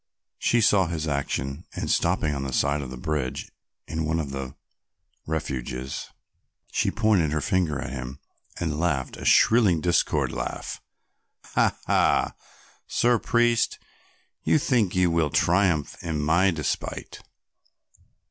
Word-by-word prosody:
She 120 Hz, -, +2 dB
saw 100 Hz, -4 st, +4 dB
his 80 Hz, -2 st, -3 dB
action, 70 Hz, +1 st, -2 dB
and -, -, -3 dB
stopping 75 Hz, -, +1 dB
on 70 Hz, -1 st, -3 dB
the 65 Hz, -2 st, -4 dB
side 70 Hz, +3 st, +1 dB
of 65 Hz, -, -6 dB
the 65 Hz, -, -7 dB
bridge 70 Hz, -1 st, -3 dB, 0.4 s
in 80 Hz, 0 st, -2 dB
one 80 Hz, +1 st, 0 dB
of 70 Hz, -4 st, -3 dB
the 70 Hz, -1 st, -5 dB, 0.7 s
refuges, 65 Hz, -4 st, -4 dB, 0.6 s
she -, -, +1 dB
pointed 105 Hz, -9 st, +2 dB
her 80 Hz, -, 0 dB
finger 90 Hz, -5 st, 0 dB
at -, -, -5 dB
him 65 Hz, 0 st, -6 dB, 0.4 s
and 80 Hz, -3 st, -2 dB
laughed 75 Hz, -7 st, -1 dB
a -, -, -8 dB
shrill 110 Hz, -8 st, +5 dB
discordant 85 Hz, -7 st, +1 dB
laugh. -, -, -5 dB, 0.7 s
"Ha, -, -, +2 dB
ha, -, -, +2 dB, 0.5 s
Sir 120 Hz, -1 st, +2 dB
Priest, 120 Hz, 0 st, +2 dB, 0.7 s
you -, -, +4 dB
think 120 Hz, -, +1 dB
you 90 Hz, -2 st, +3 dB
will 85 Hz, -2 st, +2 dB
triumph 85 Hz, -2 st, +2 dB
in 80 Hz, -3 st, -2 dB
my 85 Hz, +6 st, +3 dB
despite. 80 Hz, -5 st, -3 dB
80 Hz, 135 wpm, -25 LUFS, 70-95 Hz, 0.7 s, shrill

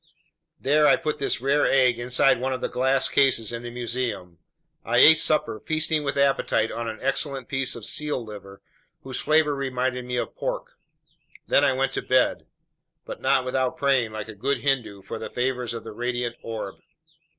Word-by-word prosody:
There 150 Hz, +3 st, +3 dB
I -, -, +6 dB
put 155 Hz, -2 st, -3 dB
this 140 Hz, -, -1 dB
rare 140 Hz, +2 st, +2 dB
egg 125 Hz, -3 st, +3 dB
inside 125 Hz, +1 st, +2 dB
one 130 Hz, +1 st, -1 dB
of 130 Hz, -, -5 dB
the -, -, -1 dB
glass 130 Hz, +1 st, +2 dB
cases 125 Hz, -6 st, +2 dB
in 115 Hz, 0 st, -5 dB
the 120 Hz, -, -7 dB
museum. 120 Hz, -7 st, -4 dB, 0.4 s
I 120 Hz, +1 st, 0 dB
ate 160 Hz, +5 st, +8 dB
supper, 150 Hz, -9 st, +1 dB
feasting 155 Hz, +1 st, 0 dB
with 140 Hz, 0 st, -2 dB
appetite 135 Hz, -5 st, +1 dB
on 115 Hz, 0 st, -4 dB
an 110 Hz, -1 st, -5 dB
excellent 135 Hz, -1 st, -2 dB
piece 135 Hz, -1 st, -1 dB
of 115 Hz, -3 st, -8 dB
seal 150 Hz, -5 st, -1 dB
liver 100 Hz, -2 st, -11 dB, 0.4 s
whose 130 Hz, -1 st, -5 dB
flavor 155 Hz, -1 st, +2 dB
reminded 130 Hz, -2 st, -2 dB
me 125 Hz, 0 st, -3 dB
of -, -, -3 dB
pork. -, -, -4 dB, 0.8 s
Then -, -, +4 dB
I -, -, +3 dB
went 135 Hz, +1 st, -1 dB
to -, -, -2 dB
bed; 130 Hz, -1 st, +1 dB, 0.6 s
but -, -, -8 dB
not 135 Hz, -1 st, +2 dB
without 130 Hz, 0 st, -1 dB
praying, 135 Hz, -5 st, +1 dB
like 110 Hz, -1 st, -5 dB
a 110 Hz, -, -8 dB
good 135 Hz, +8 st, -2 dB
Hindu, 125 Hz, -8 st, -1 dB
for 115 Hz, -, -6 dB
the 110 Hz, -, -6 dB
favors 125 Hz, -1 st, -2 dB
of 115 Hz, -1 st, -6 dB
the 110 Hz, -, -8 dB
radiant 120 Hz, +1 st, -3 dB
orb. 110 Hz, -4 st, -6 dB
125 Hz, 185 wpm, -24 LUFS, 115-135 Hz, 0.8 s, ate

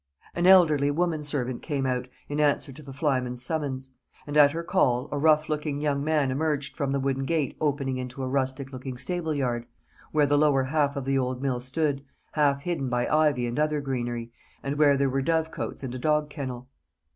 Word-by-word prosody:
An 175 Hz, +1 st, +1 dB
elderly 155 Hz, -7 st, +6 dB
woman 160 Hz, +1 st, 0 dB
servant 130 Hz, -4 st, -2 dB
came 140 Hz, -4 st, -2 dB
out, 125 Hz, -1 st, -1 dB, 0.2 s
in 145 Hz, +1 st, -3 dB
answer 145 Hz, -1 st, +2 dB
to 135 Hz, -, -11 dB
the 140 Hz, -2 st, -10 dB
flyman's 130 Hz, -3 st, -1 dB
summons; 135 Hz, -2 st, -2 dB, 0.3 s
and 145 Hz, -, -6 dB
at 145 Hz, -1 st, +8 dB
her 165 Hz, +2 st, -4 dB
call, 130 Hz, -8 st, +1 dB
a 145 Hz, -, -1 dB
rough 155 Hz, 0 st, +4 dB
looking 150 Hz, -2 st, -2 dB
young 145 Hz, -2 st, 0 dB
man 150 Hz, -3 st, +1 dB
emerged 145 Hz, 0 st, -1 dB
from 140 Hz, -1 st, -1 dB
the 140 Hz, -, 0 dB
wooden 135 Hz, 0 st, -1 dB
gate 150 Hz, -1 st, -1 dB
opening 140 Hz, -3 st, 0 dB
into 130 Hz, +1 st, -5 dB
a -, -, -2 dB
rustic 135 Hz, 0 st, -2 dB
looking 130 Hz, 0 st, -6 dB
stable 165 Hz, +1 st, -2 dB
yard, 120 Hz, -4 st, -1 dB, 0.4 s
where 150 Hz, -1 st, +3 dB
the 145 Hz, 0 st, +3 dB
lower 145 Hz, -3 st, +4 dB
half 145 Hz, +1 st, +1 dB
of 140 Hz, -2 st, -4 dB
the 135 Hz, 0 st, +1 dB
old 130 Hz, -1 st, -2 dB
mill 130 Hz, -3 st, 0 dB
stood, 140 Hz, +2 st, -1 dB, 0.3 s
half 140 Hz, -2 st, +2 dB
hidden 165 Hz, -7 st, -2 dB
by 125 Hz, 0 st, 0 dB
ivy 150 Hz, -5 st, +3 dB
and 120 Hz, +4 st, -2 dB
other 150 Hz, 0 st, +1 dB
greenery, 120 Hz, -4 st, -3 dB, 0.3 s
and 140 Hz, +2 st, -3 dB
where 145 Hz, -2 st, +5 dB
there 140 Hz, 0 st, +2 dB
were 135 Hz, +1 st, 0 dB
dovecotes 160 Hz, 0 st, -2 dB
and 125 Hz, -2 st, -4 dB
a 130 Hz, -, -5 dB
dog 150 Hz, +1 st, +1 dB
kennel. 130 Hz, -4 st, -6 dB
140 Hz, 205 wpm, -26 LUFS, 130-150 Hz, 0.4 s, at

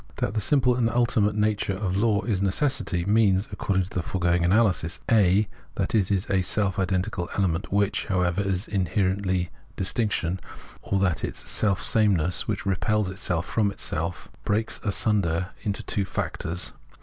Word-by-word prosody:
That 100 Hz, -, -2 dB
the 110 Hz, -, 0 dB
simple 125 Hz, +2 st, +3 dB
and 120 Hz, -2 st, +1 dB
ultimate 115 Hz, -3 st, +2 dB
nature 105 Hz, -2 st, 0 dB
of 95 Hz, -2 st, -2 dB
law 105 Hz, 0 st, +2 dB
is 105 Hz, -5 st, -1 dB
necessity 100 Hz, -, 0 dB
means, 100 Hz, -1 st, +3 dB
according 95 Hz, -1 st, 0 dB
to 90 Hz, -, -9 dB
the 90 Hz, -, -1 dB
foregoing 85 Hz, 0 st, 0 dB
analysis, 90 Hz, -3 st, +2 dB
(a) 105 Hz, -1 st, +4 dB, 0.3 s
that -, -, -2 dB
it 100 Hz, -5 st, +2 dB
is 100 Hz, -2 st, +1 dB
a 95 Hz, -1 st, +2 dB
self 95 Hz, +1 st, 0 dB
identical 95 Hz, -1 st, -1 dB
element, 95 Hz, 0 st, 0 dB
which, 100 Hz, 0 st, +1 dB
however, 90 Hz, 0 st, +1 dB
is 95 Hz, 0 st, -1 dB
inherently 95 Hz, -1 st, 0 dB, 0.2 s
distinction; 95 Hz, -2 st, -1 dB, 0.4 s
or 100 Hz, -, -1 dB
that 95 Hz, -3 st, +1 dB
it -, -, -3 dB
is -, -, -3 dB
selfsameness 95 Hz, -3 st, +2 dB
which -, -, -2 dB
repels 100 Hz, +1 st, 0 dB
itself 90 Hz, -3 st, -2 dB
from 105 Hz, -3 st, +1 dB
itself, 85 Hz, -3 st, -3 dB, 0.2 s
breaks 110 Hz, +2 st, -1 dB
asunder 100 Hz, -4 st, +1 dB
into 100 Hz, -2 st, -2 dB
two 100 Hz, -, -1 dB
factors. 90 Hz, -2 st, -3 dB
100 Hz, 155 wpm, -25 LUFS, 90-105 Hz, 0.4 s, a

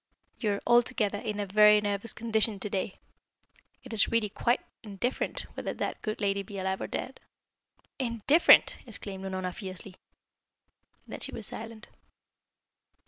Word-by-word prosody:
You 210 Hz, -4 st, +1 dB
are 200 Hz, -, -4 dB
altogether 240 Hz, -4 st, +3 dB
in 210 Hz, -2 st, -4 dB
a 205 Hz, -, -1 dB
very 210 Hz, +2 st, +6 dB
nervous 205 Hz, +2 st, -2 dB
condition 220 Hz, -2 st, +1 dB
to 210 Hz, -, -2 dB
day. 190 Hz, 0 st, -2 dB, 0.9 s
It 255 Hz, -, -9 dB
is 215 Hz, -, +4 dB
really 230 Hz, -2 st, +1 dB
quite 240 Hz, +5 st, +1 dB, 0.2 s
indifferent 225 Hz, +3 st, -3 dB
whether -, -, -4 dB
that -, -, -3 dB
good 215 Hz, -1 st, -3 dB
lady 200 Hz, -1 st, +1 dB
be 195 Hz, +1 st, -9 dB
alive 190 Hz, 0 st, -2 dB
or -, -, -3 dB
dead." -, -, -5 dB, 0.8 s
"Indifferent!" 255 Hz, +6 st, +5 dB
exclaimed 200 Hz, -3 st, -7 dB
Unorna 185 Hz, -1 st, -3 dB
fiercely. 190 Hz, -1 st, -8 dB, 1.1 s
Then -, -, -8 dB
she -, -, -4 dB
was -, -, -7 dB
silent. 225 Hz, 0 st, -7 dB
210 Hz, 140 wpm, -29 LUFS, 195-230 Hz, 1.1 s, very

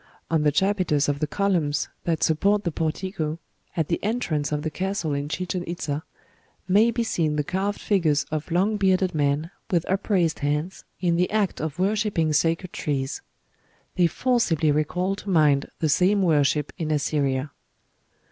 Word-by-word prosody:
On 160 Hz, -2 st, +3 dB
the 150 Hz, -1 st, +3 dB
chapiters 185 Hz, -4 st, +1 dB
of 145 Hz, -1 st, 0 dB
the 155 Hz, -, 0 dB
columns 170 Hz, -7 st, 0 dB, 0.2 s
that 165 Hz, -2 st, 0 dB
support 200 Hz, +6 st, +2 dB
the 170 Hz, -, -1 dB
portico, 160 Hz, 0 st, -2 dB, 0.4 s
at 160 Hz, -3 st, +1 dB
the -, -, -2 dB
entrance 195 Hz, -10 st, -1 dB
of 150 Hz, 0 st, -1 dB
the 155 Hz, -, -2 dB
castle 185 Hz, -3 st, -2 dB
in 140 Hz, +1 st, -2 dB
Chichen 180 Hz, +2 st, -3 dB
Itza, 155 Hz, -4 st, -3 dB, 0.7 s
may 210 Hz, +5 st, +5 dB
be 235 Hz, 0 st, 0 dB
seen 160 Hz, -8 st, 0 dB
the 150 Hz, -, 0 dB
carved 195 Hz, +5 st, -2 dB
figures 160 Hz, -8 st, +2 dB
of 155 Hz, +1 st, -3 dB
long 195 Hz, +5 st, +1 dB
bearded 190 Hz, -2 st, +2 dB
men, 145 Hz, +2 st, 0 dB, 0.2 s
with 175 Hz, -2 st, +1 dB
upraised 190 Hz, -4 st, +1 dB
hands, 150 Hz, +6 st, -2 dB, 0.2 s
in 170 Hz, -2 st, +2 dB
the 180 Hz, +1 st, +2 dB
act 210 Hz, -3 st, 0 dB
of 155 Hz, -1 st, -4 dB
worshipping 195 Hz, -5 st, +1 dB
sacred 165 Hz, +4 st, +1 dB
trees. 135 Hz, -2 st, -2 dB, 0.7 s
They 175 Hz, -2 st, +4 dB
forcibly 170 Hz, -, +1 dB
recall 180 Hz, +6 st, 0 dB
to 200 Hz, -, -8 dB
mind 150 Hz, -5 st, +3 dB
the 160 Hz, -, +2 dB
same 185 Hz, +6 st, +3 dB
worship 150 Hz, -3 st, +2 dB
in 160 Hz, -2 st, -2 dB
Assyria." 145 Hz, -2 st, 0 dB
165 Hz, 160 wpm, -24 LUFS, 150-190 Hz, 0.7 s, may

